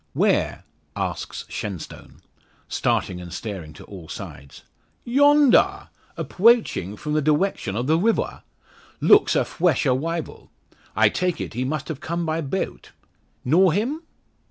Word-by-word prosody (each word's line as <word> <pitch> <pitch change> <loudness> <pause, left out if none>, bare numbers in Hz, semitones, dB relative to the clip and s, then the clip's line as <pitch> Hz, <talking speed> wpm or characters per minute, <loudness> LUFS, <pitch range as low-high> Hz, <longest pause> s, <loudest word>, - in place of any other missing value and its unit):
"Where?" - - +1 0.3
asks - - -4
Shenstone, 100 -6 -7 0.5
starting 90 -1 -1
and 85 -1 -9
staring 90 -4 -6
to - - -13
all 90 -6 -11
sides. 70 0 -9 0.4
"Yondaw! 285 +2 +4 0.3
Appwoaching 200 - +2
from 150 0 -4
the 155 - +2
diwection 150 - 0
of 120 +3 -1
the 160 +4 +2
rivaw. 225 +4 0 0.6
Looks 415 - +5
a - - +2
fwesh 175 -2 +1
awival. 155 +5 -2 0.5
I 110 0 +5
take 180 +5 -1
it, - - -5
he 125 +3 -2
must 150 +1 -3
have 155 -4 -5
come 170 +2 -3
by 160 +1 -1
bawt! 160 +6 -4 0.6
Knaw 175 +8 +5
him?" 235 - -1
155 Hz, 130 wpm, -23 LUFS, -, 0.6 s, Looks